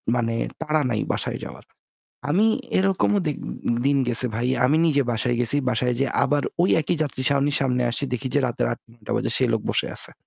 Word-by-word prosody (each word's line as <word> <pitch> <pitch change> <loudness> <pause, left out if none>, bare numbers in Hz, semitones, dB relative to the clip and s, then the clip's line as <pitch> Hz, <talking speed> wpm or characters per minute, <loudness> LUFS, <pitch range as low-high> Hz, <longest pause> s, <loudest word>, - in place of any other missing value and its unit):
মানে 115 -1 -1 0.3
তাড়া 155 -1 +1
নাই 105 - 0
বাসায় - - -1
যাওয়ার। - - -11 0.7
আমি 205 +8 +3 0.3
এরকমও 195 +2 +2
দে 150 - +1 0.5
দিন 140 0 +3
গেছে 125 +1 +3
ভাই। 120 +2 -1 0.2
আমি 150 +4 +2
নিজে 145 -3 +2
বাসায় 120 +2 0
গেছি। 125 +4 +3
বাসায় 125 +1 0
যেয়ে 135 - 0
আবার 145 -1 +1 0.2
ওই 185 - +2
একই 160 +2 -1
যাত্রী 140 -3 -3
ছাউনির 140 +1 +1
সামনে 125 -2 +1
আসছি 140 - -1
দেখি 130 +1 -2
যে 145 - +3
রাতের 115 - -1
৮-৯ঃ০০ 115 -2 -9
বাজে - - -1
সে - - +2
লোক - - -1
বসে - - -1
আছে। - - 0
135 Hz, 195 wpm, -23 LUFS, 120-150 Hz, 0.7 s, আমি